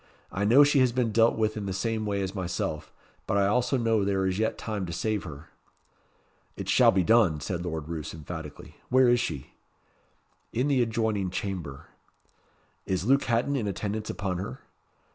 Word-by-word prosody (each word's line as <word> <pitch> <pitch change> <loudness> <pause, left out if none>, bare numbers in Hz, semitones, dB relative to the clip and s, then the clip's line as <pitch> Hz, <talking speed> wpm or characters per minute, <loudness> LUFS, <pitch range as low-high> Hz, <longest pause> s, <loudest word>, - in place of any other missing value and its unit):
"I 100 +2 -1
know 125 +7 +7
she 145 0 +3
has 130 -2 +4
been 120 -2 0
dealt 115 +1 +3
with 110 -1 0
in 105 -2 -4
the 95 - -2
same 110 +2 -2
way 100 -1 -1
as 95 - -4
myself; 85 -5 -3 0.4
but 100 - +1
I 100 - +3
also 125 +6 +1
know 115 -3 +1
there 95 -1 0
is 95 +1 -1
yet 110 - 0
time 105 -4 -4
to - - -5
save 105 +4 -2
her." 75 -1 -10 1.1
"It - - -6
shall - - +5
be 95 -1 +3
done," 105 -8 +4
said 85 +4 -4
Lord 80 -3 -4
Roos, 80 -3 -5
emphatically. 80 -1 -9
"Where 130 0 +5
is 120 0 +4
she?" 70 - -4 1.0
"In 130 +5 0
the 135 -3 +3
adjoining 110 -4 0
chamber." 90 -7 -5 1.0
"Is 95 0 -1
Luke 135 +3 +3
Hatton 120 +5 +1
in 115 -6 -1
attendance 105 +2 -3
upon 95 -3 -3
her?" 95 - -6
100 Hz, 180 wpm, -27 LUFS, 90-115 Hz, 1.1 s, know